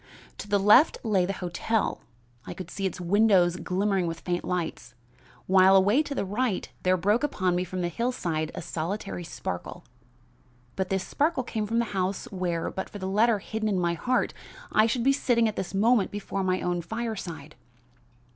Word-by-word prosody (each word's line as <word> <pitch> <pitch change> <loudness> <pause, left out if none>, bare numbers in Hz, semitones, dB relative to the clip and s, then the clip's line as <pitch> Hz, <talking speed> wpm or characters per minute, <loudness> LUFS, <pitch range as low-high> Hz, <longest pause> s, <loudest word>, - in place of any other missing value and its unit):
To - - -6
the 205 - +3
left 210 +9 +6
lay 195 -6 +2
the - - -1
hotel. 205 +5 -1 0.5
I - - -6
could 180 -2 -8
see 195 -1 -1
its 180 - -6
windows 180 -1 +3
glimmering 185 +1 0
with 165 0 -5
faint 175 -1 -2
lights, 175 -8 -4 0.5
while, 190 0 +6
away 200 +8 +5
to 290 -2 -5
the - - -1
right, 210 +1 -1
there 185 0 +2
broke 205 +6 +2
upon 185 -11 0
me 180 - 0
from 185 0 -4
the 175 - 0
hillside 175 -6 -2
a - - -5
solitary 175 +2 -4
sparkle; 90 - -6 0.9
but 190 -1 -2
this 190 -1 -1
sparkle 295 -2 0
came 220 -3 -3
from 230 +2 -1
the 235 - +2
house 190 0 -1
where, 180 -3 -2
but 190 - -5
for - - -8
the 190 - -5
letter 215 +4 +3
hidden 215 +2 -3
in 195 - 0
my 170 -1 +1
heart, 250 +9 0 0.4
I 215 +1 +4
should 230 +1 -1
be 275 +2 +4
sitting 240 -4 +2
at 215 - -3
this 190 +1 -4
moment 220 +1 +3
before 200 -1 -4
my 185 0 0
own 175 -1 -1
fireside. 175 -8 -5
195 Hz, 185 wpm, -27 LUFS, 180-220 Hz, 0.9 s, left